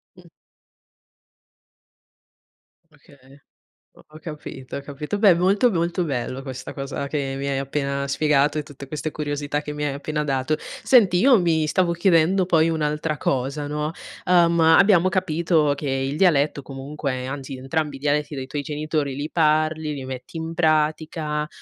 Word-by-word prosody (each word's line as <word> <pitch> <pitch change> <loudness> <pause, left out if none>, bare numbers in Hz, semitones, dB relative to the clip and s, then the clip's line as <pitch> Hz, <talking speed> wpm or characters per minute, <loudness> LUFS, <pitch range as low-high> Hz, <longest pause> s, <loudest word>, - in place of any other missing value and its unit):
Mh. - - -17 2.7
Okay, 145 -1 -21 0.8
ho - - -17
ho 155 - -13
capito, 150 -5 -8
ho 140 - -4
capito. 150 +7 -5
Beh, 205 -3 +6
molto, 195 +7 +3
molto 175 +1 0
bello 130 -2 -3
questa 130 -2 -7
cosa 140 0 -4
che 140 -2 -2
mi 140 - -3
hai 140 -1 0
appena 140 0 -2
spiegato 145 +1 +2
e - - -4
tutte 140 -1 -11
queste 150 +2 -4
curiosità 145 -1 -3
che 150 - -5
mi 150 0 -3
hai 140 - -1
appena 150 +2 -3
dato. 135 +1 0 0.3
Senti, 210 -9 +5
io 250 +3 +5
mi 160 -2 +2
stavo 175 +1 +1
chiedendo 175 +1 +3
poi 165 -2 +3
un'altra 150 -1 -1
cosa, 135 +3 -1
no? 150 +1 -2 0.3
Ehm, 170 -2 +4
abbiamo 175 +3 +5
capito 165 -4 +1
che 140 0 -4
il 135 +1 -1
dialetto 155 -5 +3
comunque 135 -1 -5
anzi, 135 0 -6
entrambi 145 +2 -2
i - - -9
dialetti 150 +1 0
dei 130 -1 -4
tuoi 145 +2 -3
genitori 150 -1 -2
li 145 +2 -4
parli, 155 -1 +1
li 135 -2 -6
metti 130 +5 -7
in 160 0 -4
pratica, 155 -1 0
150 Hz, 155 wpm, -23 LUFS, 140-165 Hz, 2.7 s, Beh